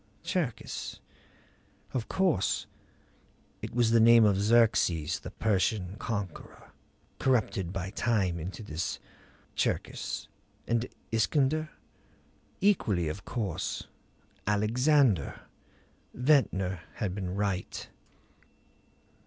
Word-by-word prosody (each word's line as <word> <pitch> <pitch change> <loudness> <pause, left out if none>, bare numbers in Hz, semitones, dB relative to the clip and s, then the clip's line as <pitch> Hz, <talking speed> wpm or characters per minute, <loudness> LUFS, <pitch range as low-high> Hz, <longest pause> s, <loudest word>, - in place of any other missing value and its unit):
Cherkis? 170 - -3 0.9
Of 125 -4 -2
course 180 - +1 1.0
it - - -6
was 120 -2 +3
the 115 - +5
name 115 0 +7
of 100 -2 +4
Xerxes, 95 -7 +3
the - - -8
Persian 100 -2 0
Conqueror, 105 -7 -5 0.5
corrupted 110 -9 +1
by 95 0 -4
time 100 -7 +1
into 95 +7 -6
this 80 -3 -3 0.6
Cherkis. - - -2 0.4
And 115 +1 +1 0.2
Iskander? 145 +7 +2 0.9
Equally, 105 - +2
of 95 +6 -6
course 100 -9 -3 0.6
Alexander. 115 - +3 0.7
Ventnor 100 - +2
had 100 -5 -2
been 95 -2 -4
right. 100 -2 -2
105 Hz, 85 wpm, -30 LUFS, 95-120 Hz, 1.0 s, name